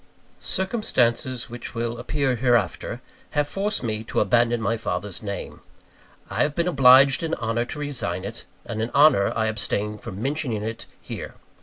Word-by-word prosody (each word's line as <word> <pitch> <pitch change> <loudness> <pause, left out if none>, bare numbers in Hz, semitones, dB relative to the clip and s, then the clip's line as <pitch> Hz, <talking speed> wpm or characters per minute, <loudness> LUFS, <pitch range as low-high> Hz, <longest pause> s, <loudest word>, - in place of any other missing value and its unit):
Circumstances 130 - 0
which 120 0 -8
will 115 0 -2
appear 140 -4 0
hereafter, 120 -6 0 0.4
have 145 0 +2
forced 200 0 -1
me 110 -2 -2
to - - -1
abandon 120 -1 +3
my 110 +1 0
father's 105 -3 -4
name. 100 -3 -6 0.7
I - - -2
have 145 0 +1
been 170 0 0
obliged 135 -3 +6
in 165 0 -1
honour 115 0 -1
to 145 - -7
resign 145 -3 -2
it; - - -7 0.2
and 110 -2 -4
in 115 - -1
honour 140 -9 +5
I 110 - +1
abstain 105 -1 -1
from 100 -3 -8
mentioning 130 -4 -1
it 115 +1 -5
here. - - -7
120 Hz, 160 wpm, -24 LUFS, 110-140 Hz, 0.7 s, obliged